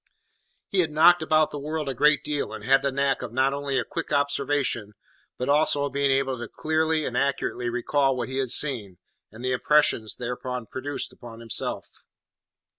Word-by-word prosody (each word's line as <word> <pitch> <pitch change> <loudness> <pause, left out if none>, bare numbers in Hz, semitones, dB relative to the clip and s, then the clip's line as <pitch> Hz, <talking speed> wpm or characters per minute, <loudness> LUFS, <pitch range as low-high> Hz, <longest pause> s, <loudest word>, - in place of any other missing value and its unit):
He 195 - 0
had 165 -3 +2
knocked 165 +3 +5
about 155 0 +2
the 145 - -5
world 155 +1 -4
a 135 - -1
good 150 +4 +3
deal, 150 -5 -3
and 110 -1 -8
had 135 +4 +4
the 140 - 0
knack 140 0 0
of 125 -3 -6
not 130 +3 +1
only 140 -1 -2
a 125 - +1
quick - - -6
observation, 140 -6 0 0.4
but 125 - -3
also 145 0 +3
of 140 - -5
being 140 0 +1
able 135 -1 +1
to 120 - -5
clearly 155 0 0
and - - -4
accurately 140 -3 -1
recall 135 +3 +1
what 120 - -3
he 130 +1 -3
had 130 -2 -1
seen, 115 -9 +1 0.3
and 115 +4 -9
the 130 - 0
impressions 140 -4 +2
thereby 125 +1 -4
produced 140 +2 -4
upon 115 -2 -12
himself. 115 -1 -3
135 Hz, 190 wpm, -25 LUFS, 125-150 Hz, 0.4 s, knocked